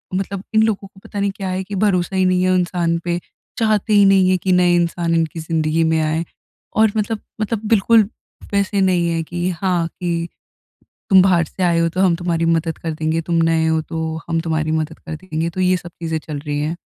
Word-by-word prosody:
मतलब 195 0 -3
इन 220 0 +5
लोगों 210 -3 -1
को 195 0 -20
पता 205 - -6
नहीं 200 0 +1
क्या 190 -2 -4
है 185 +1 -2
कि 200 +2 -6
भरोसा 190 -2 +1
ही 185 0 +3
नहीं 185 0 +2
है 185 0 +3
इंसान 175 -2 0
पे। 175 0 0 0.4
चाहते 215 -1 +1
ही 205 -1 +6
नहीं 190 -1 +5
है 185 - +3
कि 185 +1 -1
नए 180 -1 +4
इंसान 170 -1 0
इनकी 165 0 -1
ज़िंदगी 160 0 0
में 160 0 +2
आए। 155 +2 0 0.5
और 220 -1 +5
मतलब, 215 +1 -1 0.2
मतलब 215 0 -1
बिल्कुल 220 -1 +4 0.4
वैसे 200 0 +1
नहीं 180 -2 +2
है 165 -1 -1
कि 175 +2 -3
हाँ, 175 -1 0
कि 170 -2 -3 0.8
तुम 190 -1 +8
बाहर 180 -3 +3
से 185 - -7
आए 170 -1 +3
हो 165 0 +2
तो 180 +3 -3
हम 185 -3 +4
तुम्हारी 170 -1 -1
मदद 165 0 0
कर 165 -1 -4
देंगे, 160 +1 -1
तुम 170 +1 -3
नए 165 -1 +2
हो 160 0 +2
तो 160 0 -4
हम 165 -1 0
तुम्हारी 160 -1 -1
मदद 160 0 -2
कर 160 - -7
देंगे। 165 -1 -3
तो 185 - -5
ये 185 0 +3
सब 175 0 -9
चीज़ें 160 -1 -2
चल 150 -1 -6
रही 145 0 -3
है। 155 +3 -2
175 Hz, 225 wpm, -19 LUFS, 165-190 Hz, 0.8 s, तुम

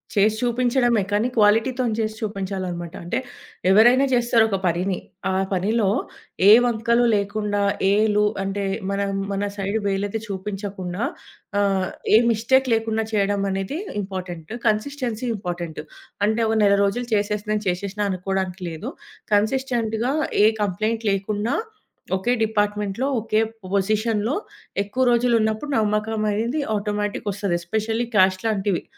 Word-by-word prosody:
చేసి 210 +1 +4
చూపించడమే, 245 -1 +2
కానీ 210 +4 +2
క్వాలిటీతోని 225 +3 +3
చేసి 215 0 -1
చూపించాలనమాట. 190 -5 -4
అంటే, 175 +7 -2 0.5
ఎవరైనా 240 +7 +6
జేస్తారొక 230 -4 +3
పనిని, 180 +2 0 0.3
ఆ - - 0 0.2
పనిలో 200 +3 +1 0.6
ఏ - - +10
వంకలు 235 +1 +2
లేకుండా, 205 0 -1 0.3
ఏ - - +4 0.2
లు 210 - +4 0.2
అంటే, 195 +1 -2 0.3
మనా 200 0 0 0.3
మన 200 +1 -1
సైడ్ 200 +2 -1
వేలెత్తి 200 +2 -1
చూపించకుండా, 195 -1 -4 0.6
ఆహ్, 195 -2 +1 0.3
ఏ - - +10
మిస్టేక్ 260 +4 +2
లేకుండా 225 0 0
చేయడమనేది 200 - 0 0.2
ఇంపార్టెంటు, 185 -1 -6
కన్సిస్టెన్సీ 240 +1 -1
ఇంపార్టెంటు. 175 -5 -5 0.4
అంటే, 220 +2 +1
ఒక 225 - +1
నెల 200 -1 +5
రోజులు 235 +5 -1
చేసేసినా 210 0 0
నేను 210 0 -2
చేషేషినా 200 +3 -2
అనుకోడానికి 190 0 -3
లేదు, 160 -1 -6 0.4
కన్సిస్టెంట్‌గా, 235 +1 0 0.3
ఏ - - +7 0.2
కంప్లెయింట్ 215 +4 -1
లేకున్నా, 205 +3 -1 0.6
ఒకే 235 +6 0
డిపార్ట్‌మెంట్‌లో, 210 +2 -1
ఒకే 215 0 +1 0.3
పొజిషన్‌లో, 215 - +1 0.5
ఎక్కువ 250 +6 -1
రోజులున్నప్పుడు 235 +2 +1
నమ్మకమనేది 215 +4 0 0.2
ఆటోమేటిక్‌గొస్తది. 205 -2 -2
ఎస్పెషల్లీ 220 +5 -1
క్యాష్‌లాంటివి 190 0 +2
210 Hz, 110 wpm, -23 LUFS, 195-225 Hz, 0.6 s, ఏ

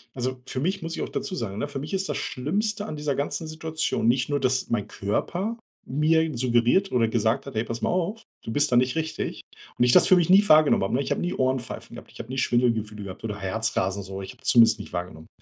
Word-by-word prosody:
Also, 130 0 -3
für 130 - -4
mich 185 +7 -1
muss 165 0 -4
ich - - -4
auch - - -3
dazu 210 -2 -4
sagen, 105 - -4
ne, 145 - -2
für 140 -1 -5
mich 150 +7 -7
ist 195 0 -1
das - - -1
Schlimmste 205 - -2
an 155 - -6
dieser 150 -2 -1
ganzen 150 +3 -3
Situation 155 -5 -2
nicht 125 +2 +2
nur, 145 -1 +1
dass 130 0 0
mein 115 -4 -1
Körper 180 - -2 0.3
mir 155 +3 +2
suggeriert 120 +10 +2
oder 120 -2 +2
gesagt 115 +3 0
hat: 140 -4 -9
„Hey, 110 - +1
pass 115 0 -5
mal - - 0
auf. 185 +5 -1 0.2
Du - - -5
bist 145 +4 +1
da - - +3
nicht 125 +1 +3
richtig.“ 160 0 -3 0.4
Und - - +3
ich 125 - +4
das 180 - +6
für 185 - +7
mich 175 0 +2
nie 200 +2 +6
wahrgenommen 155 -8 +6
habe, 95 - -1
ne? 135 - +1
Ich - - -4
habe - - 0
nie 175 - -1
Ohrenpfeifen 130 -2 -2
gehabt, - - -12
ich - - -15
habe 115 - -7
nie 130 - -4
Schwindelgefühle 115 -5 0
gehabt 95 +2 -9
oder 105 -2 -4
Herzrasen 100 -1 -1
so. 95 +1 -7
Ich 95 - -8
habe - - -25
es 135 - 0
zumindest 115 -4 +6
nicht 100 - -9
wahrgenommen. 85 -3 -6
130 Hz, 255 wpm, -25 LUFS, 115-160 Hz, 0.4 s, für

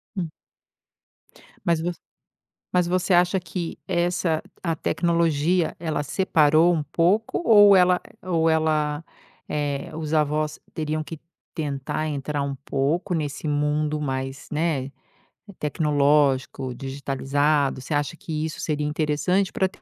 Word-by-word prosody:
Hum. 175 -4 -2 1.4
Mas 170 -2 +2
você 175 0 -3 0.8
mas 180 -1 +3
você 185 +1 0
acha 180 +2 +4
que 175 -1 -5
essa 175 -2 0 0.2
a 165 -2 0
tecnologia 170 0 +1
ela 160 -3 -2
separou 160 0 +3
um 155 -3 0
pouco 195 - +1
ou 205 -3 +8
ela 180 0 +4 0.2
ou 165 -3 +1
ela, 155 -1 +1 0.4
eh, 145 +2 -2
os 160 0 -3
avós 150 0 +1
teriam 155 0 -2
que 160 -1 -8 0.3
tentar 145 0 -3
entrar 145 0 -3
um 140 0 -2
pouco 155 +8 0
nesse 150 -1 -3
mundo 150 +1 0
mais, 135 -1 -4
né, 150 -4 -1 0.7
tecnológico, 145 -4 +1
digitalizado, 140 +1 0
você 150 - -5
acha 145 +2 -1
que 155 -1 -4
isso 160 - -5
seria 150 -1 -1
interessante 160 +6 +1
para 190 - +1
ter 185 - -19
155 Hz, 125 wpm, -24 LUFS, 145-170 Hz, 1.4 s, ou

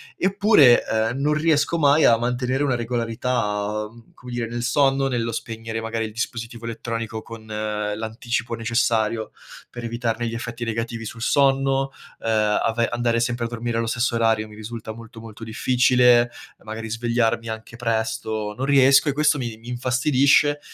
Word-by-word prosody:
Eppure, 195 - +5
ehm, 110 +3 0
non 150 +2 +2
riesco 155 +1 +2
mai 145 0 +4
a 115 - +6
mantenere 125 +3 -1
una 135 -3 +1
regolarità, 115 -3 -2 0.3
come 125 0 -11
dire 120 -1 -2
nel 120 +1 -4
sonno, 135 +1 +2
nello 115 -2 -1
spegnere 115 0 -5
magari 115 0 -2
il 110 - -6
dispositivo 120 +2 -3 0.3
elettronico 115 -1 -4
con 115 -1 -10
l'anticipo 110 +3 -3
necessario, 115 -1 0 0.4
per 120 - -8
evitarne 115 0 -2
gli 115 - -4
effetti 115 0 -5
negativi 115 0 -3
sul 115 +2 -8
sonno, 135 0 +2 0.3
ehm, 115 - -3 0.3
ave 115 0 +1
andare 120 -1 0
sempre 120 0 -1
a - - -1
dormire 115 0 -3
allo 115 0 -1
stesso 120 +1 0
orario 110 -2 +1
mi 105 - -13
risulta 110 0 -7
molto, 115 0 -12
molto 115 0 -11
difficile. 125 +1 +3 0.3
Magari 110 +1 -6
svegliarmi 115 0 0
anche 110 +1 -7
presto, 110 -2 -2
non 130 - -2
riesco 135 +1 +5
e - - 0
questo 150 +1 +2
mi 120 -3 -4
mi 115 +2 -12
infastidisce, 135 +4 +3
115 Hz, 155 wpm, -23 LUFS, 115-125 Hz, 0.4 s, a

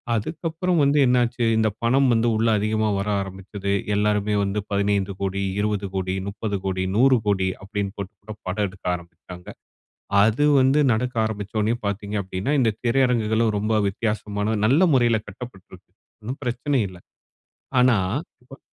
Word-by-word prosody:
அதுக்கப்புறம் 165 - -1
வந்து 140 +1 +3
என்ன 125 0 +4
ஆச்சு, 120 0 -3
இந்த 110 -1 +3
பணம் 130 +2 +3
வந்து 115 +1 +2
உள்ள 115 +1 +1
அதிகமா 110 +1 0
வர 100 - -2
ஆரமிச்சது. 100 +1 -5 0.2
எல்லாருமே 105 0 +1
வந்து 100 +1 -1
15 100 -1 0
கோடி, 100 0 -1 0.2
20 105 -1 -1
கோடி, 95 0 -1
30 100 0 -3
கோடி, 95 -1 -1
100 130 -1 +5
கோடி 95 -2 +2
அப்பிடின்னு 100 0 -4
போட்டு 100 +2 -6
கூட 110 +1 -8
படம் 100 +3 0
எடுக்க 95 0 -18
ஆரம்பித்தாங்க. 90 +1 -12 0.8
அது 110 +7 +2 0.2
வந்து 135 +3 +3
நடக்க 125 +2 -2
ஆரம்பிச்சவொன்னே 110 +1 -1
பாத்தீங்க 100 +1 -3
அப்படின்னா, 95 +7 -3
இந்த 115 -3 +3
திரையரங்குகளும் 115 -3 +2
ரொம்ப 105 +2 -1 0.2
வித்தியாசமான 105 0 -2
நல்ல 140 +10 +4
முறையில 120 -4 +3
கட்டப்பட்டுருக்கு. 95 -4 -11 0.3
ஒண்ணும் 125 +7 -6
பிரச்சன 125 +2 -1
இல்ல. 95 -1 -12 0.8
ஆனா, 125 -2 +5 0.5
இப்ப. 135 +3 -14
105 Hz, 145 wpm, -23 LUFS, 100-120 Hz, 0.8 s, 100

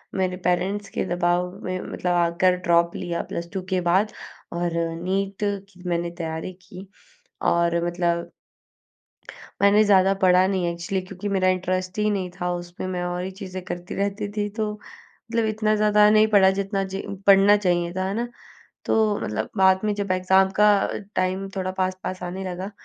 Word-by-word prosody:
मेरे 185 -1 0
पेरेंट्स 190 +3 0
के - - +1
दबाव 175 0 +1
में 185 0 -3
मतलब 180 - -3
आकर 175 +1 +3
ड्रॉप 170 0 +3
लिया, 175 -2 -3
प्लस 170 0 -5
2 190 - -2
के 185 -2 +1
बाद, 195 +5 +3 0.4
और 175 0 -1 0.3
नीट 195 +2 -2
की 200 -2 -4
मैंने 170 0 -1
तैयारी 160 +2 -4
की। 185 +1 -11 0.6
और 170 0 +2
मतलब 175 -1 -1 1.3
मैंने 200 +2 +6
ज़्यादा 195 -2 +4
पढ़ा 185 0 +5
नहीं 190 -2 0
एक्चुअली, 170 +3 -3
क्योंकि 195 +1 -6
मेरा 190 -2 +1
इंटरेस्ट 185 0 -1
ही 210 - +2
नहीं 190 -3 -2
था 180 0 0
उसमें। 175 +1 -6
मैं 180 -1 -3
और 175 0 -3
ही 190 - -4
चीज़ें 185 -1 -7
करती 175 -1 -6
रहती 200 +1 -2
थी, 205 - 0
तो 215 0 -2
मतलब 225 +2 -6
इतना 215 0 +1
ज़्यादा 210 0 +5
नहीं 215 0 +5
पढ़ा, 200 -3 +5
जितना 195 0 -1
ज 190 0 -5 0.3
पढ़ना 200 +1 +7
चाहिए 175 -3 0
था। 185 0 -2
है 195 - -2
ना? 235 +3 -2 0.6
तो 215 -2 +2
मतलब 110 +1 -3
बाद 190 0 +5
में 210 -1 +1
जब 200 -2 -2
एग्ज़ाम 190 +1 +3
का 210 - +7 0.5
टाइम 185 +1 0
थोड़ा 185 -1 -2
पास-पास 185 0 -3
आने 185 +2 -5
लगा, 185 +3 -6
185 Hz, 170 wpm, -24 LUFS, 180-200 Hz, 1.3 s, पढ़ना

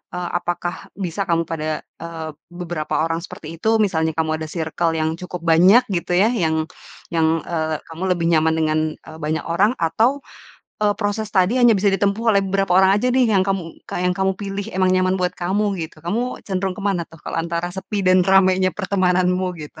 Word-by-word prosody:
eee, 180 -1 -3
apakah 175 0 -3 0.2
bisa 195 0 -3
kamu 165 -1 +2
pada, 155 -1 -3 0.2
eee, 165 -1 -6 0.2
beberapa 175 -3 -5
orang 165 0 -1
seperti 165 -1 -10
itu? 220 +4 +2
Misalnya 160 -4 -1
kamu 160 -1 0
ada 160 - -5
circle 165 +1 -1
yang 160 0 0
cukup 180 -1 -7
banyak 180 +9 +6
gitu 175 -1 -1
ya, 210 +6 +4
yang 160 -8 0 0.5
yang, 160 0 +2
eee, 160 -2 -1
kamu 165 +3 -6
lebih 170 -1 -2
nyaman 160 0 +3
dengan, 155 -1 +1 0.2
eee, 160 - -13
banyak 155 +1 -2
orang, 190 +6 +2
atau, 220 - +2 0.7
eee, 205 - +4
proses 205 +1 -1
tadi 190 +6 +3
hanya 240 -2 +6
bisa 200 -1 +2
ditempuh 200 +3 +1
oleh 200 -3 +4
beberapa 195 -1 +1
orang 190 0 +6
aja 250 - +1
nih, 250 0 +3
yang 195 - +4
kamu 195 -1 0 0.3
ka - - -4
yang 180 - +2
kamu 190 +1 0
pilih 200 0 -4
emang 185 -1 +3
nyaman 185 0 +2
buat 180 -1 0
kamu, 195 +4 -1
gitu. 160 -1 -8
Kamu 235 +8 -2
cenderung 190 -1 -2
ke 205 - -7
mana 195 -4 +1
tuh, 165 - -15
kalau - - -2
antara 170 +1 -3
sepi 195 +1 -4
dan 185 0 +5
ramainya 190 -1 +4
pertemananmu, 185 -2 +1 0.2
gitu? 150 - -13
180 Hz, 195 wpm, -21 LUFS, 165-195 Hz, 0.7 s, banyak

